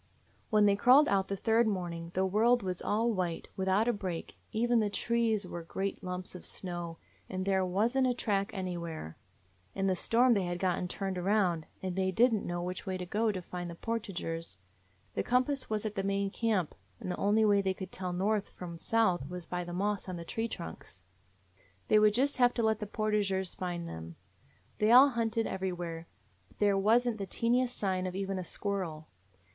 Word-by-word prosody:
"When 210 -1 +5
they 200 -1 +5
crawled 255 +8 +6
out 195 -1 +2
the 200 - -2
third 225 +3 +3
morning 175 -4 -3
the 190 +1 +2
world 225 +5 +3
was 185 -2 -3
all 225 +3 +1
white, 180 -4 -2
without 190 +4 +2
a 240 - +3
break; 185 -5 -5 0.2
even 235 +2 +2
the 210 -2 +1
trees 225 -1 0
were 175 -1 -6
great 195 +5 -4
lumps 180 0 -4
of 180 - -9
snow, 175 -3 -5 0.3
and 185 0 -3
there 190 -1 +2
was 205 +7 +1
n't 265 -1 +4
a 250 - +1
track 200 -4 0
anywhere. 170 - -5 0.6
In 195 - 0
the 190 -1 +2
storm 240 +6 +4
they 195 -4 +1
had 175 0 -2
gotten 180 -1 0
turned 190 0 -3
around, 180 -4 +1 0.2
and 185 -1 -2
they 190 0 +1
did 230 +6 +4
n't 210 - -1
know 175 0 -2
which 180 +1 -5
way 185 -1 -1
to 180 - -5
go 215 +4 +1
to 185 -3 -5
find 175 0 -6
the 170 - -7
portageurs. 175 -6 -4 0.6
The - - 0
compass 255 +3 +1
was 215 0 -1
at 215 - -2
the 195 - -1
main 195 0 0
camp, 210 -8 0 0.3
and 185 - -4
the - - -3
only 215 +2 +3
way 205 -1 +4
they 190 -1 0
could 190 -1 -7
tell 180 -1 -4
north 200 +3 0
from 170 -2 -8
south 185 -11 +1
was 180 -1 -6
by 180 +1 -3
the 175 - -7
moss 200 +2 -1
on 185 - -4
the 170 -1 -7
tree 225 +6 -2
trunks. 90 - -8 0.9
They 215 - +6
would 210 0 +5
just 275 +4 +2
have 245 -1 +4
to 235 - 0
let 220 -1 +2
the 210 - -4
portageurs 205 -3 0
find 175 -2 -4
them. 80 - -8 0.6
They 215 +1 +4
all 260 +4 +9
hunted 230 -2 0
everywhere, 175 -3 -4 0.4
but - - -25
there 205 -1 +3
was 225 +5 +4
n't 225 -3 -1
the 195 - -3
teeniest 245 +5 +1
sign 185 -2 0
of 180 - -5
even 195 -1 -2
a - - -3
squirrel. 175 -5 -3
195 Hz, 205 wpm, -31 LUFS, 180-220 Hz, 0.9 s, all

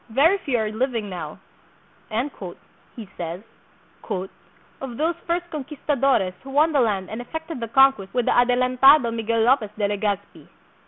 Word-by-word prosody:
"Very 310 - +3
few 270 -8 -1
are 215 -2 -1
living 225 -3 -2
now," 180 - -6 1.6
he 225 -4 -8
says, 170 +3 -5 1.4
"of 250 -3 -6
those 320 +3 +1
first 345 +1 -1
conquistadores 275 -8 0
who 270 - -11
won 300 +4 +3
the 290 - +2
land 205 -6 +1
and 220 +2 -5
effected 320 +3 -6
the 230 - -4
conquest 250 -5 +4
with 245 -2 0
the - - +2
Adelantado 250 +2 +5
Miguel 230 0 -1
Lopez 235 -2 +3
de 205 -1 +1
Le 205 0 -2
gazpi." 205 -1 -3
245 Hz, 150 wpm, -23 LUFS, 215-275 Hz, 1.6 s, Adelantado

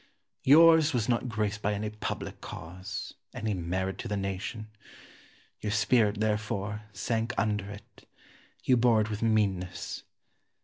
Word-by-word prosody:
Yours 160 +1 +7
was 115 -3 +1
not 125 0 +1
graced 105 -2 -1
by 105 0 0
any 105 +1 -3
public 105 - -5
cause, 90 +2 -7 0.2
any 110 -1 -1
merit 95 +2 -2
to - - -4
the 105 -2 -1
nation. 100 +3 -4 0.9
Your 105 - -2
spirit, 105 0 +3
therefore, 105 -1 -1
sank 115 +4 -1
under 105 -3 0
it; 100 0 -12 0.6
you 125 - +4
bore 115 -2 +4
it 110 +1 -2
with 105 - -3
meanness. 95 -6 0
105 Hz, 135 wpm, -29 LUFS, 100-115 Hz, 0.9 s, Yours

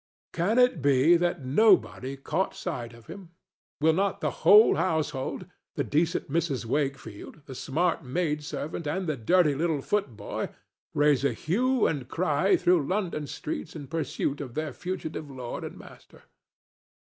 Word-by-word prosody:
Can 190 +8 +1
it 250 - +4
be 140 +4 +5
that 175 -6 -1
nobody 140 - +3
caught 185 +7 -2
sight 120 -10 -5
of 115 -1 -16
him? 180 +1 -10 0.5
Will 160 +2 +4
not 195 +3 0
the - - -1
whole 210 +2 +8
household—the 155 -6 -3
decent 160 +3 0
Mrs. 150 -5 -1
Wakefield, 135 0 -4
the 135 - -9
smart 165 +6 -1
maid 150 +2 -1
servant 150 +2 -5
and 185 +5 -2
the 155 -3 -1
dirty 150 +6 +3
little 155 -1 -1
footboy—raise 145 - -2
a 140 - +2
hue 245 +9 +1
and 140 -6 -1
cry 175 +3 +2
through 175 -5 +2
London 180 -7 -2
streets 300 - -5
in 150 -3 -7
pursuit 145 -2 -2
of 130 -4 -8
their 155 -3 -3
fugitive 160 -4 -5
lord 125 -3 -6
and - - -7
master? - - -15
155 Hz, 145 wpm, -27 LUFS, 140-180 Hz, 0.5 s, whole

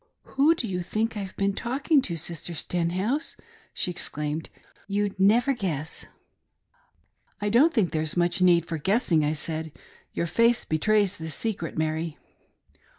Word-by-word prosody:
"Who 295 +5 +3
do 245 - -3
you 180 -2 -2
think 220 +5 -1
I've 195 -3 -6
been 200 0 +1
talking 270 - +1
to. 170 -9 -3
Sister 170 +1 -5
Sten 170 +2 -1
house 220 - -1 0.2
?" 450 - -29
she 180 - 0
exclaimed, 150 -2 -3 0.2
" - - -32
You'd 200 -1 -1
never 230 +7 +4
guess." 165 - -3 0.7
" - - -36 0.5
I 205 - -1
don't 265 +10 +5
think 215 - +1
there's 155 +1 -1
much 175 +1 +1
need 175 -2 +5
for 165 -2 -4
guessing," 180 - +2
I 150 +1 +1
said,. 160 +1 -4 0.4
"Your - - -1
face 230 +7 +3
betrays 200 +4 +2
the 160 0 -6
secret, 170 0 -3
Mary." 160 0 -1
185 Hz, 160 wpm, -26 LUFS, 160-225 Hz, 0.7 s, don't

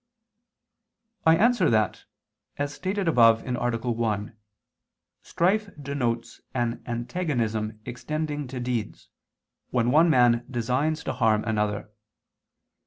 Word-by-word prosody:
I 160 - +7
answer 220 -5 +3
that, 110 -3 +1 0.5
As 145 0 -2
stated 190 +4 -2
above 115 -7 +5
(A. 130 - -4 0.4
1), 110 -2 -2 0.9
strife 200 +5 0
denotes 120 -5 -3
an 120 -1 -1
antagonism 115 -4 -2
extending 150 +3 -4
to 130 0 -6
deeds, 120 -3 -4 0.6
when 120 -1 +1
one 160 +4 +5
man 120 -4 +4
designs 130 +6 -1
to - - -2
harm 110 -4 +2
another. 105 -2 -2
125 Hz, 105 wpm, -26 LUFS, 115-155 Hz, 0.9 s, I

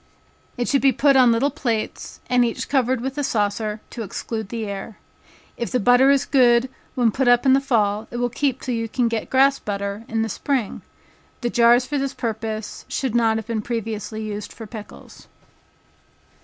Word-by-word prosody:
It 245 - -1
should 275 - +2
be 275 - +5
put 280 +1 +3
on 255 -2 +6
little 250 +5 +2
plates, 225 -4 -3
and 250 -1 +3
each 235 -1 -2
covered 260 -3 +1
with 265 +3 -4
a - - 0
saucer, 210 -2 -1
to 235 - -6
exclude 220 0 -5
the 230 -2 -4
air. 200 +1 -6 0.6
If 235 - -3
the 250 - +1
butter 245 +4 +5
is 280 -1 +3
good 245 -2 +4 0.3
when 240 -3 +3
put 265 +3 0
up 245 +2 +4
in 265 - +6
the 270 - +4
fall, 220 -5 0
it 240 - -6
will 245 0 +1
keep 270 0 -1
till 255 - -3
you 230 -1 -2
can 245 +1 +1
get 230 -1 -3
grass 275 +1 +4
butter, 200 +1 -4
in 225 0 -1
the - - -1
spring. 255 0 -2 0.6
The 240 -1 -1
jars 240 +1 +5
for 285 +2 -2
this 275 0 -3
purpose 220 -2 -4
should 260 -5 -2
not 225 -2 +3
have 220 - -5
been 225 -1 -2
previously 220 -1 -4
used 210 -1 -5
for 225 - -9
pickles. 215 -1 -11
235 Hz, 195 wpm, -22 LUFS, 220-260 Hz, 0.6 s, on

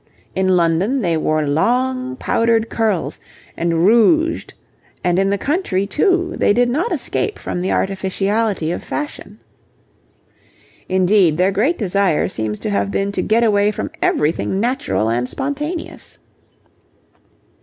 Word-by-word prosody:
In 185 -1 +2
London 180 +10 +1
they 170 -2 +1
wore 155 -1 0
long 255 - 0
powdered 230 -2 +1
curls 215 -6 -1 0.4
and 170 0 0
rouged, 310 - +3 0.5
and 175 0 +2
in 195 0 +2
the 200 - +1
country 270 - -1
too 355 - +1
they - - +3
did 245 +2 +2
not 330 - -1
escape 425 - -1
from 175 - -4
the 185 - -1
artificiality 195 -1 -1
of - - -4
fashion. 290 -8 -6 1.5
Indeed, 185 -3 +3
their 185 +2 +3
great 240 - +1
desire 195 -5 +1
seems 110 -1 -3
to - - -2
have 100 0 0
been 195 - -1
to - - -1
get 230 +2 +2
away 205 -2 +3
from 210 - -4
everything 160 +5 0
natural 250 - 0
and 120 +2 -1
spontaneous. 295 +5 -5
200 Hz, 135 wpm, -18 LUFS, 175-255 Hz, 1.5 s, rouged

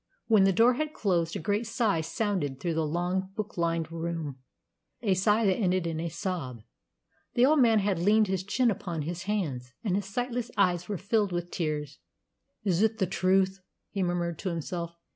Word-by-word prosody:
When 215 -4 +5
the 195 - +5
door 230 +6 +5
had 305 +4 -3
closed 170 -5 0
a - - -2
great 205 +7 -1
sigh 215 -8 +1
sounded 165 -5 -2
through 170 +3 -1
the 160 -1 0
long, 180 +4 -1
book 215 -1 -4
lined 165 -1 -1
room, 165 -4 -4 0.6
a 200 -4 +3
sigh 210 +4 +3
that 190 -2 +3
ended 185 -4 +1
in 165 -1 -2
a 170 +1 -2
sob. 155 - -4 0.7
The 245 - +6
old 300 +2 +4
man 230 -4 +5
had 200 -3 +1
leaned 210 +5 +4
his 190 -2 -1
chin 235 +4 +2
upon 170 -6 -4
his 175 +3 -5
hands, 145 -12 -2
and 195 -5 +1
his 200 -1 -2
sightless 245 +2 -2
eyes 180 -2 +2
were 205 - -1
filled 205 +2 +1
with 175 0 -3
tears. 150 -4 -3 0.6
"Is 185 -3 +1
it 220 0 +2
the 195 - +2
truth?" 190 +1 +2 0.3
he 200 - -2
murmured 175 -2 -1
to 190 - -2
himself. 170 0 -4
185 Hz, 190 wpm, -28 LUFS, 170-210 Hz, 0.7 s, The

